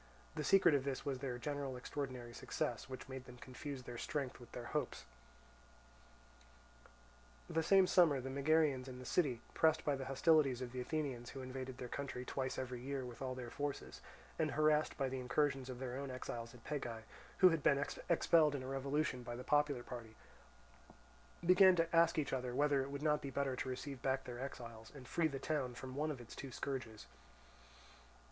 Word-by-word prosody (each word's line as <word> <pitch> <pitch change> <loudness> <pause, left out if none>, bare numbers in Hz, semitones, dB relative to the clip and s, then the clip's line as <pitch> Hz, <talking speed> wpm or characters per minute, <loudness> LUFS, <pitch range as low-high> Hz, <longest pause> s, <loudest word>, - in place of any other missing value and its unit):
The 155 -1 -3
secret 190 +1 +6
of 140 -2 +3
this 135 -1 -3
was 135 -2 -1
their 130 -2 -3
general 140 0 -3
extraordinary 125 -2 -5
success, - - -3
which 130 -1 -7
made 130 -1 -7
them 125 -1 -11
confuse 130 +2 -7
their 120 -1 -7
strength 140 -4 -3
with 120 -1 -13
their 120 - -6
hopes. 145 - -2 2.4
The 165 - +1
same 190 +3 +6
summer 170 -7 +5
the 135 +1 -5
Megarians 140 -1 +2
in 130 -1 -7
the 125 - -9
city, 130 -9 +1
pressed 160 -1 +3
by 145 - +2
the 135 -1 -5
hostilities 135 -1 +4
of 125 -2 -5
the 130 0 -3
Athenians, 130 -4 -2
who 135 - -7
invaded 130 0 -5
their 125 - -5
country 125 -1 -4
twice 130 -1 -2
every 125 -2 -4
year 135 0 -3
with 120 0 -9
all 130 -1 -2
their 120 -2 -6
forces, 145 0 -4 0.4
and 155 -1 +2
harassed 155 0 +3
by 135 - +1
the 130 0 -3
incursions 135 +1 +1
of 125 - -5
their 125 -1 -4
own 140 0 -4
exiles 120 -2 -5
at 120 - -15
Pegae, 120 -7 -4 0.3
who 185 - +8
had 165 -3 +1
been 140 - +4 0.3
expelled 160 -3 +5
in 130 - -3
a - - -6
revolution 135 0 -1
by 120 0 -5
the 125 - -6
popular 145 -4 +2
party, 115 -3 -8 1.3
began 185 +1 +8
to 165 0 +1
ask 165 0 +5
each 150 -3 0
other 125 -1 -2
whether 145 0 +3
it 135 - -4
would 140 +1 -5
not 150 -1 +3
be 140 - -4
better 135 -1 -1
to 130 - -3
receive 130 0 -5
back 135 0 +1
their 120 -1 -7
exiles, 115 -4 -7
and 130 -3 -10
free 170 -2 +2
the 140 -3 -4
town 135 -4 -1
from 130 +1 -7
one 150 +3 -1
of 145 -4 -4
its 120 -1 -10
two 135 - -7
scourges. 120 -6 -4
135 Hz, 195 wpm, -38 LUFS, 125-150 Hz, 2.4 s, who